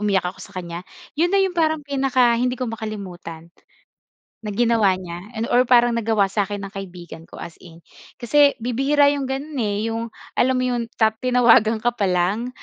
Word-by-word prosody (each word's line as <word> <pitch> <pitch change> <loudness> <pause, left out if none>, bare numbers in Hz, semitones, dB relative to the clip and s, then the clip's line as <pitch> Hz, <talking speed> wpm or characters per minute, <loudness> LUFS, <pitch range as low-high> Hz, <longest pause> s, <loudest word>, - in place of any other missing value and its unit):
umiyak 200 -3 +1
ako 180 - -10
sa 200 - -11
kan'ya 170 -1 -5 0.4
yun 345 - +3
na - - +4
yung 380 - 0
parang 315 -2 +1
pinaka 265 -3 +2
hindi 250 +1 0
ko 255 - -3
makalimutan 185 -7 -7 0.9
na 215 - -7
ginawa 225 -5 +3
niya, 175 -2 -8 0.2
and 225 - -1
or 250 +1 +3
parang 240 -1 +5
nagawa 220 -3 +1
sa 195 +1 -1
akin 205 -1 -5
ng 195 - -8
kaibigan 175 -4 -9
ko, - - -12
as 170 - -10
in. 170 -1 -15 0.3
Kasi 285 +4 +3
bibihira 270 +5 +2
yung 275 -2 -3
gano'n, 275 +3 -4
eh, 215 +1 -1
yung 230 +1 -4 0.2
alam 255 +1 +2
mo 255 - 0
yun 240 -2 -2
ta 220 -1 +3
tinawagan 235 -2 +3
ka 240 +2 0
pa 200 -5 -1
lang 185 +7 0
225 Hz, 190 wpm, -21 LUFS, 195-255 Hz, 0.9 s, parang